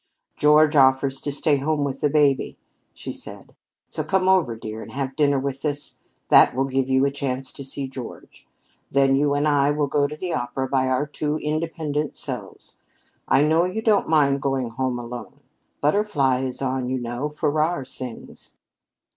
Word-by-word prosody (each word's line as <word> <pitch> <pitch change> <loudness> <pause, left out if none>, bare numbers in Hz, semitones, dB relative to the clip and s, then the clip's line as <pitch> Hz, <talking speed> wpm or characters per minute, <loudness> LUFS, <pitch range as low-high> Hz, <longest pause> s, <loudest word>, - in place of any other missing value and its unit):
"George 150 +1 +4
offers 135 0 +3
to 145 - -2
stay 145 +1 +2
home 145 +1 0
with 135 -1 -3
the 150 - +2
baby," 140 -2 +2 0.3
she - - -7
said. - - -11 0.3
"So - - -4
come 190 -1 +1
over, 185 -11 +3
dear, 110 0 -7
and - - -10
have 135 -1 -3
dinner 145 -1 +3
with 135 0 -3
us; 145 -1 -3 0.3
that - - +6
will 135 +1 +1
give 135 0 -1
you 130 +1 +3
a 140 - +1
chance 135 -2 -3
to 140 - -8
see 135 0 -4
George. 130 -2 -10 0.4
Then 135 0 +3
you 145 +1 +2
and 145 +1 +1
I 145 -1 +3
will 145 0 +1
go 145 0 +1
to 150 - -7
the 180 +1 -3
opera 125 +2 -2
by 130 -1 +1
our 130 +2 +1
two 150 +1 -2
independent 155 -1 -2
selves. - - -8 0.5
I 135 - +4
know 160 +3 +3
you 215 +5 -3
don't 210 -6 +2
mind 140 -3 +3
going 135 -4 -1
home 130 +1 -2
alone. 120 +3 -8 0.4
'Butterfly' 145 -7 +1
is 130 +1 -4
on, 130 -1 -1
you 130 - -1
know 120 +4 -3
Farrar 150 +1 0
sings." 125 -2 -9
140 Hz, 180 wpm, -23 LUFS, 130-150 Hz, 0.5 s, that